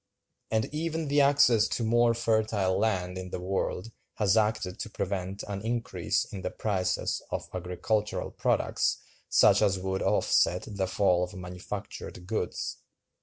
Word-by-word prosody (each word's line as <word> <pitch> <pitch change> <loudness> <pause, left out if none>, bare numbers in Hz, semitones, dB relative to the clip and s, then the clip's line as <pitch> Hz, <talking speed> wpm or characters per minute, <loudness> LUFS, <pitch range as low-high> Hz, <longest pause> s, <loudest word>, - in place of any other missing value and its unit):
And 110 0 +1
even 160 0 -2
the 145 +1 +4
access 125 -6 +5
to 120 - -2
more 120 +1 +3
fertile 110 -5 +1
land 95 -4 0
in 90 0 -6
the - - -4
world 95 +3 -2 0.2
has 105 -1 +2
acted 105 -4 +1
to 115 - -4
prevent 95 -1 -3
an 100 -1 -5
increase 115 +1 -1
in 95 - -8
the - - -2
prices 95 -4 -1
of - - -4
agricultural 95 +4 -2
products - - +1 0.3
such - - +5
as 95 -1 +3
would 95 0 -2
offset 90 +2 +2
the 100 -3 -2
fall 90 -2 +2
of 90 +3 -5
manufactured 90 0 -7
goods. 110 +4 -3
100 Hz, 145 wpm, -29 LUFS, 95-115 Hz, 0.3 s, access